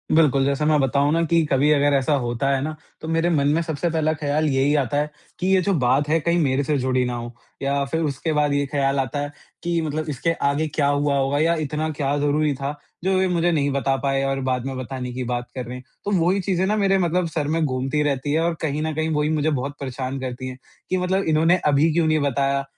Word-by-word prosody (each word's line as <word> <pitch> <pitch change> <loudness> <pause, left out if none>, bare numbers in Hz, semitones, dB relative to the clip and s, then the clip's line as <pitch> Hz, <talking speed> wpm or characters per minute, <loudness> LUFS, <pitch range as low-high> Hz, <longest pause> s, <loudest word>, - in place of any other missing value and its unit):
बिल्कुल 140 -4 +4
जैसे 140 +2 0
मैं 150 -1 +3
बताऊँ 140 +2 +2
ना 165 - +2
कि 165 +1 +3
कभी 140 +2 +3
अगर 145 -1 +3
ऐसा 135 +3 +1
होता 120 +3 -1
है 135 -1 +1
ना 155 +2 -3 0.3
तो 160 - -6
मेरे 165 +1 +1
मन 145 -4 +2
में 155 +3 +2
सबसे 160 +1 -2
पहला 155 -1 +1
ख़्याल 155 0 -1
यही 135 +1 +2
आता 140 -1 0
है 150 +1 0 0.3
कि 185 - -1
ये 190 -1 +4
जो 195 +2 +1
बात 135 +4 +2
है 160 +1 +3
कहीं 170 +2 +1
मेरे 140 -3 +1
से 150 +1 0
जुड़ी 130 -1 +1
ना 125 - -2
हो 120 0 -6 0.3
या 140 0 0
फ़िर 160 +4 -2
उसके 150 +2 -2
बाद 150 -1 +2
ये 145 0 +1
ख़्याल 140 -1 +1
आता 135 +1 -2
है 145 0 -3 0.3
कि 170 -1 0
मतलब 155 0 -3
इसके 150 +4 0 0.2
आगे 150 +3 0
क्या 150 -1 0
हुआ 145 0 +1
होगा 135 +1 +1
या 165 +2 +3
इतना 155 +2 -2
क्या 140 +1 +1
ज़रूरी 145 +1 +1
था 140 +2 -3 0.3
जो 190 0 +2
ये 190 - +2
मुझे 175 -1 +1
नहीं 145 -3 +1
बता 135 0 +1
पाए 135 -1 +1
और 135 0 -1
बाद 125 -1 -1
में 135 -1 -4
बताने 130 0 -5
की 130 +1 -3
बात 120 0 -3
कर 125 -1 -4
रहे 125 +1 -7
हैं। 125 - -11 0.2
तो 205 - -1
वही 185 +3 +2
चीज़ें 185 0 0
ना 210 +2 +1
मेरे 195 -2 +3
मतलब 180 -1 +1
सर 155 -3 -2
में 160 +2 0
घूमती 135 +2 -1
रहती 145 0 -1
हैं 160 - +2
और 170 +1 +1
कहीं 150 -1 -1
न 160 0 -2
कहीं 160 +1 -1
वो 150 - +1
ही 150 - +1
मुझे 155 0 +1
बहुत 140 -1 -2
परेशान 130 0 -4
करती 130 0 -5
है 130 0 -7 0.3
कि 185 - +1
मतलब 185 +2 0
इन्होंने 160 +3 +4
अभी 150 +2 +4
क्यों 165 0 +2
नहीं 155 0 +2
बताया 140 0 0
145 Hz, 255 wpm, -22 LUFS, 135-160 Hz, 0.3 s, बिल्कुल